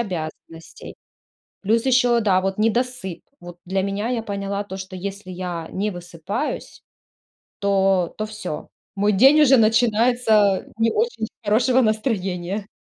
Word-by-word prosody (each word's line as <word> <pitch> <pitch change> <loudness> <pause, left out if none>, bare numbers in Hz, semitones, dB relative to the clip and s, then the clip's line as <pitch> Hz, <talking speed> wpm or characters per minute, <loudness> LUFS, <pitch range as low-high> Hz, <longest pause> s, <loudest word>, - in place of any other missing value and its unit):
обязанностей. 165 -4 -7 0.7
Плюс 225 +5 +1
ещё, 245 -2 +4
да, 190 -4 +3
вот 195 +1 -2
недосып. 225 -4 -1 0.2
Вот 175 0 -11
для 190 +1 -1
меня 200 +3 -2
я 245 -2 -1
поняла 200 -1 -3
то, 190 -1 -7
что 190 -1 -8
если 195 0 -6
я 175 -2 -5
не 210 +2 -2
высыпаюсь, 175 - -5 0.8
то 195 -3 +2
то 215 - -2
всё. 210 -7 -7 0.3
Мой 205 +1 +2
день 270 +10 +6
уже 270 -2 +6
начинается 225 -2 +3
не 225 0 +2
очень 450 - -1
с - - -11 0.2
хорошего 245 +5 +3
настроения. 200 -4 -1
205 Hz, 135 wpm, -22 LUFS, 190-230 Hz, 0.8 s, день